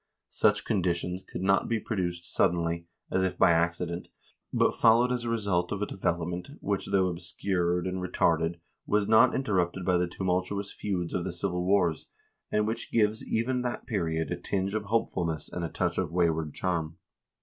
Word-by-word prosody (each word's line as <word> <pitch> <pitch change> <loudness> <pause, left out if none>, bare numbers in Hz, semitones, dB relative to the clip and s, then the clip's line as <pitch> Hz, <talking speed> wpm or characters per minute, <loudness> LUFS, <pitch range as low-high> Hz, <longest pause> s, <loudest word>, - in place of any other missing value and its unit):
Such - - +2
conditions 90 0 0
could 95 - -7
not 95 0 +3
be 115 -1 +1
produced 90 -5 -3
suddenly, 85 0 +1 0.2
as 95 - +2
if 95 - -1
by - - +6
accident, 85 +1 0 0.4
but - - +3
followed 120 +2 +5
as 120 -1 -1
a - - -1
result 100 -6 0
of 100 - -2
a - - +1
development 85 -2 -2
which, 100 -1 -2
though 95 -1 +3
obscured 90 0 -1
and 95 0 -2
retarded, 85 -1 +1 0.3
was 105 -1 +2
not 110 +3 +6
interrupted 95 -7 0
by 90 -2 +3
the 90 - +1
tumultuous 95 +3 -2
feuds 90 -4 -3
of 90 - -1
the - - -3
civil 90 +1 -2
wars, 90 -4 +2 0.4
and 105 0 +2
which 110 +2 -3
gives 110 -1 +2
even 125 +3 0
that 125 -1 -3
period 85 -9 -1
a 90 - -1
tinge 95 +1 -1
of 110 -1 -2
hopefulness 90 -8 -1
and 90 - -3
a 85 - -2
touch - - -1
of - - -1
wayward 80 -3 +1
charm. 85 -3 -2
90 Hz, 175 wpm, -28 LUFS, 85-100 Hz, 0.4 s, by